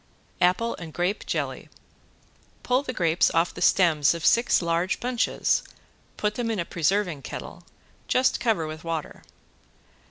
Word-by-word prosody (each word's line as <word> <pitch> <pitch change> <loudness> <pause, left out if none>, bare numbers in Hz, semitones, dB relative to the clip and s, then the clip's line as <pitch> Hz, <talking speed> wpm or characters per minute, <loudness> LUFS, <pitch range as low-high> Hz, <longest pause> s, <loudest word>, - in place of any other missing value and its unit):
~APPLE 185 +6 +2
AND 165 -3 -9
GRAPE 180 +4 -2
JELLY~ - - -3 0.9
Pull 250 +1 +2
the 280 - -5
grapes 170 -7 +2
off 165 +1 +2
the - - -9
stems 160 -5 +4
of 165 - -5
six 235 +1 +4
large 170 +2 0
bunches, 245 -1 0 0.6
put 210 0 0
them 235 0 -3
in 225 - -1
a 170 - -2
preserving 175 -2 0
kettle, - - -8 0.5
just 255 +1 +2
cover 225 -9 +1
with 155 0 -7
water. 165 -2 -4
180 Hz, 145 wpm, -25 LUFS, 165-230 Hz, 0.9 s, stems